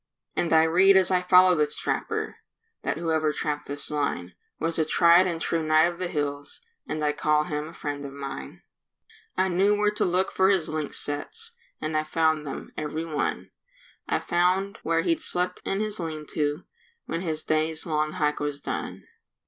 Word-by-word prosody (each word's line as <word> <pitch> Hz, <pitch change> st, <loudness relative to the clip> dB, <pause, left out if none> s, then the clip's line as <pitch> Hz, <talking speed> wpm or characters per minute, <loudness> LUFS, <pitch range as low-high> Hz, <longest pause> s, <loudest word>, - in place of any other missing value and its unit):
And 170 Hz, -, 0 dB
I 160 Hz, 0 st, +6 dB
read 185 Hz, +4 st, +5 dB
as 190 Hz, -1 st, +3 dB
I 180 Hz, -1 st, +3 dB
follow 180 Hz, 0 st, +6 dB
this 150 Hz, -3 st, +1 dB
trapper, -, -, -2 dB, 0.4 s
That -, -, -2 dB
whoever 160 Hz, -2 st, +1 dB
trapped 150 Hz, -1 st, -3 dB
this 145 Hz, +1 st, -5 dB
line 90 Hz, -, -2 dB, 0.3 s
Was 165 Hz, 0 st, -1 dB
a -, -, +4 dB
tried 170 Hz, +3 st, +5 dB
and 170 Hz, -2 st, -2 dB
true 165 Hz, 0 st, 0 dB
knight 155 Hz, 0 st, +4 dB
of 175 Hz, 0 st, 0 dB
the 185 Hz, -, -1 dB
hills, 145 Hz, -3 st, -3 dB, 0.3 s
And 155 Hz, 0 st, -3 dB
I 150 Hz, -, +3 dB
call 150 Hz, 0 st, +2 dB
him 150 Hz, 0 st, -3 dB
a 165 Hz, -, -11 dB
friend 145 Hz, -3 st, -4 dB
of 140 Hz, -, -6 dB
mine. 135 Hz, -, -7 dB, 0.7 s
I 185 Hz, +1 st, +3 dB
knew 190 Hz, +3 st, +3 dB
where 210 Hz, 0 st, +2 dB
to 210 Hz, -, -1 dB
look 185 Hz, +1 st, +1 dB
for 190 Hz, 0 st, +3 dB
his 190 Hz, -5 st, +2 dB
lynx 155 Hz, -2 st, -3 dB
sets, 450 Hz, -, -4 dB, 0.3 s
And 155 Hz, 0 st, -3 dB
I 155 Hz, -, +2 dB
found 155 Hz, -1 st, +1 dB
them, -, -, -6 dB
every 155 Hz, +2 st, -3 dB
one; 155 Hz, -2 st, -2 dB, 0.6 s
I -, -, +2 dB
found 185 Hz, +3 st, +1 dB
where 165 Hz, 0 st, +1 dB
he'd 330 Hz, -1 st, +1 dB
slept 180 Hz, -, -1 dB
in 195 Hz, +2 st, -1 dB
his 215 Hz, -1 st, -3 dB
lean 155 Hz, -3 st, -4 dB
to 150 Hz, +2 st, -1 dB, 0.4 s
When 165 Hz, -, -3 dB
his 155 Hz, -3 st, -3 dB
day's 155 Hz, 0 st, 0 dB
long 155 Hz, -1 st, 0 dB
hike 150 Hz, -4 st, 0 dB
was 145 Hz, -1 st, -2 dB
done. -, -, -5 dB
160 Hz, 190 wpm, -26 LUFS, 150-180 Hz, 0.7 s, I